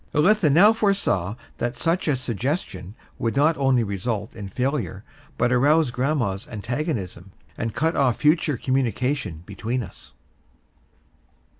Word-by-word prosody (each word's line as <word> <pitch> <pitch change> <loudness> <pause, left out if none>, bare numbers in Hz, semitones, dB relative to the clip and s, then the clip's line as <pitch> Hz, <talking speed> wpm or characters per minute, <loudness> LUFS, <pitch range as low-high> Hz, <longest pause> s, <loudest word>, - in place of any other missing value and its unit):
Elitha 175 +2 +4
now 200 +9 +7
foresaw 195 - 0 0.2
that 120 +1 -2
such 165 +7 0
a 145 - +3
suggestion 115 - -3 0.2
would 115 +1 -1
not 155 +4 +4
only 135 -3 +3
result 105 +1 -3
in 100 -3 -7
failure, 120 - -2 0.3
but 125 - +2
arouse 145 +3 +3
grandma's 120 -7 -1
antagonism, 110 - -4 0.2
and 115 -2 -4
cut 160 +3 +1
off 130 -4 +2
future 150 -2 +2
communication 125 - -1
between 115 +6 -3
us. - - -13
125 Hz, 125 wpm, -24 LUFS, 105-150 Hz, 0.3 s, now